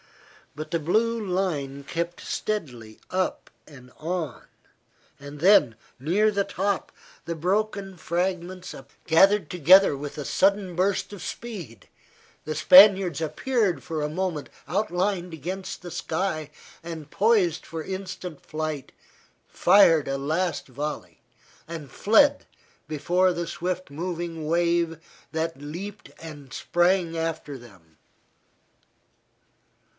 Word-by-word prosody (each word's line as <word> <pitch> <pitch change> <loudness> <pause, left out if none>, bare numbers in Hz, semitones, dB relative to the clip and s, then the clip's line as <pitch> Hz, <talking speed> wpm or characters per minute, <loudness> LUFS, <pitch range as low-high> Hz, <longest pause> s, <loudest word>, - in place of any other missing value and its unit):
But 155 +1 -7
the 170 - +1
blue 220 +8 +1
line 160 -8 -2
crept 170 +3 -3
steadily 125 - -4
up 185 0 -2 0.2
and 130 -4 -14
on, 160 -4 -4 0.8
and 145 +1 -10
then, 170 - +5 0.2
near 185 +11 +2
the 200 -1 +1
top, 195 0 -2 0.3
the 170 - -3
broken 195 +3 -1
fragments 180 +2 -3 0.3
gathered 190 +2 +4
together 180 0 +6
with 145 +1 -7
a 145 - -4
sudden 195 -2 +1
burst 190 +3 0
of 205 - -9
speed, 170 - -7 0.6
the 155 - -4
Spaniards 185 0 +7
appeared 180 - 0
for 160 -3 -3
a 150 - -1
moment 170 -2 -3 0.2
outlined 180 0 -1
against 185 +4 -6
the 175 - -7
sky 160 -2 -2 0.3
and 160 -3 -8
poised 200 -6 +2
for 160 -1 -6
instant 185 -4 -6
flight, 155 -2 -4 0.6
fired 170 -7 +5
a 135 0 -1
last 160 +5 -1
volley, 145 0 -6 0.5
and 160 -5 -7
fled 255 - +4 0.4
before 180 +5 +2
the 170 -1 -3
swift 180 0 -3
moving 165 0 -4
wave 170 -1 +1 0.3
that 160 -2 -3
leaped 185 +8 -7
and 145 -5 -10
sprang 175 +3 +1
after 160 -3 -3
them. 90 -10 -18
170 Hz, 115 wpm, -25 LUFS, 155-190 Hz, 0.8 s, Spaniards